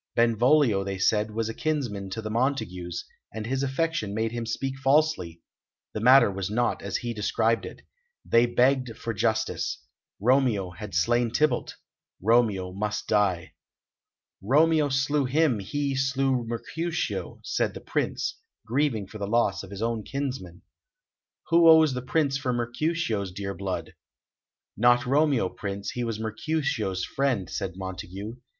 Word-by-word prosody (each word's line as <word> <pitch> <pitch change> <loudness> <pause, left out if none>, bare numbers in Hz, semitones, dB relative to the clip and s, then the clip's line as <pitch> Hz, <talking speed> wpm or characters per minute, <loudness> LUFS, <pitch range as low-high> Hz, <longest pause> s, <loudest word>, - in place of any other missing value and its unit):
Benvolio, 120 -1 +3
they 95 0 -4
said, 105 +3 +2
was 110 +1 -2
a 115 - -4
kinsman 120 -11 -2
to 110 +4 -5
the 110 - -4
Montagues, 110 -9 -2 0.3
and 110 0 -5
his 130 +3 -1
affection 135 -6 -1
made 110 +1 0
him 120 -1 -4
speak 135 +3 -2
falsely; 135 - +1 0.5
the - - -3
matter 125 -1 +6
was 95 -1 -3
not 120 +3 0
as 100 -1 -2
he 120 -1 -4
described 110 +2 0
it. - - -12 0.4
They 115 +1 +4
begged 125 -1 +2
for 115 - -4
justice. 110 +2 -1 0.4
Romeo 115 -5 +2
had 105 +2 -8
slain 120 +7 +2
Tybalt; 135 +1 0 0.4
Romeo 105 -4 +2
must 105 +2 -3
die. 100 -5 +1 0.9
"Romeo 150 +7 +3
slew 140 +1 +1
him, 135 -3 +2
he 140 +7 -2
slew 135 -2 0
Mercutio," 160 +9 -3
said - - -1
the - - -6
Prince, - - -2 0.3
grieving 120 -3 0
for 105 +3 -10
the 100 - -3
loss 105 -3 +1
of 95 - -10
his 100 +2 -5
own 115 -1 -1
kinsman. 125 -9 -5 0.9
"Who 170 -1 +6
owes 160 -3 +7
the 125 - -3
price 140 +1 +1
for 135 -2 -2
Mercutio's 120 - -1
dear 100 +1 -4
blood?" 95 -1 -4 0.8
"Not 120 +2 +4
Romeo, 140 -5 +2
Prince; 100 +1 -5
he 125 - -3
was 115 -2 -3
Mercutio's 110 - -2
friend," 135 -9 -1
said 95 - -4
Montague. 95 +4 -7
115 Hz, 145 wpm, -26 LUFS, 100-135 Hz, 0.9 s, owes